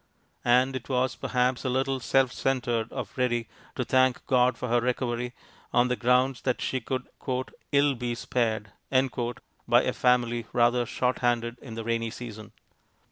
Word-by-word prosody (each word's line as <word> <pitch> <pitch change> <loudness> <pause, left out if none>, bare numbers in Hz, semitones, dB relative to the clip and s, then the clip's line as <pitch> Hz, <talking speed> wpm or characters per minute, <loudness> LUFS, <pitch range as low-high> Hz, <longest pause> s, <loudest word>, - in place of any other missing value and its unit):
And 125 +2 +3
it 130 +1 -6
was 130 -1 +1
perhaps 125 0 0
a 130 - 0
little 135 +1 0
self 130 +1 +2
centred 120 -4 -1
of - - -6
Ready 120 -2 +1 0.3
to 125 - -1
thank 130 0 +2
God 125 -1 +3
for 125 - -4
her 120 0 +2
recovery 125 0 -2 0.4
on 125 +1 +3
the 125 - +1
grounds 125 +1 +2
that 125 -2 0
she 130 - -1
could 130 +2 -3 0.7
"ill 140 0 +4
be 120 -1 -3
spared" 110 -3 -1 1.0
by - - +5
a - - 0
family 120 -2 +2
rather 120 0 +3
short 125 +2 0
handed 120 -1 0
in 115 -4 -9
the 115 - -4
rainy 115 0 -1
season. 110 -2 -8
125 Hz, 160 wpm, -27 LUFS, 120-130 Hz, 1.0 s, by